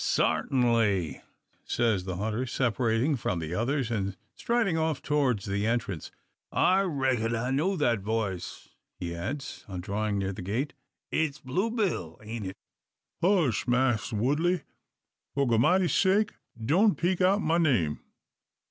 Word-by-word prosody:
"Sartinly," 115 - +1 0.4
says 110 -6 +1
the 95 -2 -3
hunter, 110 +6 -2
separating 120 +2 +1
from 105 -6 -2
the 80 0 -4
others, 120 +4 0
and 100 -4 -2 0.2
striding 230 -7 +1
off 160 -3 0
towards 135 -8 +1
the 100 +1 -1
entrance. 110 -8 -2 0.4
"I 190 +2 +4
reck'n 130 - 0
I 125 +3 -1
know 165 +9 +1
that 120 - +2
voice," 100 -3 -3 0.3
he 85 -1 -4
adds, 120 +12 -5
on 95 -3 -5
drawing 105 +2 -1
near 100 0 -1
the - - -7
gate. 115 +10 -2 0.4
"It's 155 -3 0
Blue 155 - -1
Bill, 185 - -2
ain't 110 -2 -5
it?" 95 - -7 0.6
"Hush, 170 - +2
Mass' 125 -2 +2
Woodley! 150 - +1 0.7
For 140 0 +2
Goramity's 170 +11 +3
sake 205 +2 +3 0.3
doan 180 - +3
peak 180 +2 0
out 195 +3 +3
ma 165 +2 +2
name. 110 - +2
120 Hz, 140 wpm, -28 LUFS, 105-160 Hz, 0.7 s, I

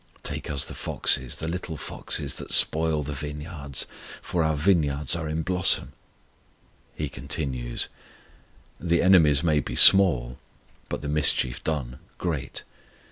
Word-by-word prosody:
Take - - -4
us 70 -2 0
the - - -8
foxes, 65 -1 0
the 80 - -5
little 85 -2 -5
foxes, - - -3
that - - -8
spoil 80 -1 +3
the 75 +1 -5
vineyards; 75 -1 -4 0.4
For 85 -2 -1
our 80 -1 +1
vineyards 75 -4 +2
are 80 -2 -4
in 80 +1 -2
blossom, 90 -6 +1 1.0
He 75 - -3
continues. 65 -3 -3 0.9
The 85 -1 +1
enemies 80 -6 +5
may 80 -3 +2
be - - -5
small, 65 -11 +6 0.5
but - - -4
the 75 - -5
mischief 75 -4 +1
done 65 -5 -3 0.2
great. 80 -6 -4
75 Hz, 135 wpm, -25 LUFS, 70-80 Hz, 1.0 s, small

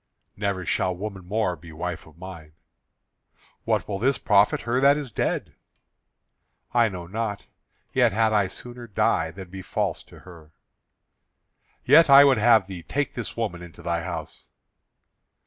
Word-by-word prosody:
"Never 100 -3 -2
shall 90 +2 0
woman 100 0 -6
more 105 -2 0
be 80 +1 -13
wife 85 +1 -5
of 80 0 -18
mine." 85 -4 -10 1.1
"What - - 0
will 100 -2 -3
this 130 +4 +2
profit 105 -1 +3
her 120 +2 0
that 140 +1 +5
is 140 -5 -6
dead?" - - -2 1.2
"I 120 -2 +4
know 90 -3 -7
not, 105 +2 -4 0.5
yet - - +4
had 110 +2 +2
I 100 -3 +3
sooner 120 +5 -10
die 80 -5 +1
than 90 +1 -11
be 95 0 -7
false - - -2
to - - -16
her." 80 -4 -15 1.3
"Yet 165 -2 +6
I 140 +1 +10
would 135 -5 +4
have 110 -2 +5
thee 95 -3 -8
take 140 - -2
this 105 -3 -6
woman 105 -7 -3
into 85 -1 -12
thy 85 0 -1
house." 80 -3 -7
100 Hz, 155 wpm, -25 LUFS, 85-115 Hz, 1.3 s, I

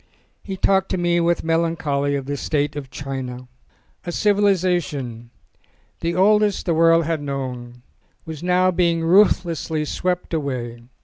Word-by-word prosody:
He 195 -2 -6
talked 190 0 +2
to - - -1
me 175 -1 +1
with 170 0 +1
melancholy 160 -4 0
of 135 -2 -3
the 145 +1 -3
state 145 0 -1
of 140 -3 -6
China. 130 -2 -6 0.6
A 175 - -4
civilisation, 175 - 0 0.7
the 170 +1 -2
oldest 210 +2 +3
the 170 - +1
world 165 0 +4
had 160 -1 -1
known, 125 -4 -6 0.4
was 160 -3 -7
now 180 +1 +2
being 170 -2 +1
ruthlessly 170 -4 +2
swept 180 +3 -2
away. 125 -6 -3
165 Hz, 135 wpm, -21 LUFS, 140-180 Hz, 0.7 s, world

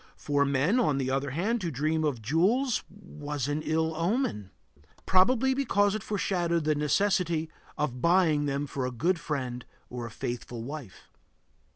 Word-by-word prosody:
For 145 -1 +1
men, 140 - +2
on 155 - +2
the 130 -1 -1
other 135 +1 0
hand, 205 - -1
to 175 - -1
dream 155 +3 0
of 135 -7 -1
jewels 210 - +2
was 150 - -6
an 145 +1 -1
ill 160 +1 0
omen; 165 - -1 0.6
probably 250 +8 +4
because 205 -7 +2
it 215 - -2
foreshadowed 175 -5 0
the 155 0 +2
necessity 165 +1 +1 0.3
of 125 -5 -2
buying 165 -4 +3
them 140 +1 -1
for 135 -2 -3
a - - -4
good 165 +9 0
friend 130 -6 -3 0.3
or 120 -1 -5
a - - -8
faithful 120 +1 -5
wife. 135 -5 -9
155 Hz, 160 wpm, -28 LUFS, 140-185 Hz, 0.6 s, probably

